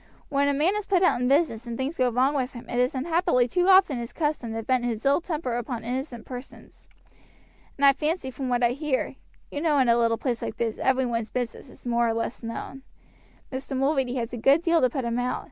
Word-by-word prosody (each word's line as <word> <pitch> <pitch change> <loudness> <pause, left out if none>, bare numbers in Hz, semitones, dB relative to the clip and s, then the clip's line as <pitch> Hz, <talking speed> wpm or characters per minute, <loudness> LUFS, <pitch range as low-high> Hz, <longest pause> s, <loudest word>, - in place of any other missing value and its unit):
When 280 0 +2
a 285 - +2
man 325 +8 +2
is 420 -1 -3
put 380 -2 +3
out 345 -8 +3
in 250 - +1
business 270 -5 +1
and 235 -1 -4
things 270 +5 -2
go 255 -1 +3
wrong 255 +4 +2
with 260 -3 -2
him 240 -1 -10
it 245 - -2
is 250 +2 +1
unhappily 320 -2 +2
too 355 +9 +1
often 375 -9 +5
his 235 0 -6
custom 295 -7 -2
to 225 - -3
vent 255 +1 +1
his 235 0 -3
ill 280 +4 +3
temper 305 -8 -3
upon 240 -1 -4
innocent 250 0 -4
persons; 250 +1 -11 0.9
and 280 - +3
I 275 - +8
fancy 300 -1 -2
from 260 0 -4
what 245 0 +1
I 240 - +4
hear 280 0 -2 0.3
you 290 - -4
know 310 -3 +2
in 260 -3 +3
a 235 - +5
little 230 -1 +2
place 240 -2 -2
like - - -5
this 225 -2 -2
every 260 0 +2
one's 230 -2 -2
business 245 -2 -4
is - - -17
more 235 -1 +2
or 225 - 0
less 230 +1 -3
known 235 +3 -6 0.7
Mr. 265 0 -4
Mulready 270 -2 +1
has 240 -1 -3
a - - -3
good 275 +8 +4
deal 335 -1 +3
to 255 - +4
put 260 0 -3
him 235 +1 -1
out. 250 +1 -1
260 Hz, 240 wpm, -26 LUFS, 240-290 Hz, 0.9 s, I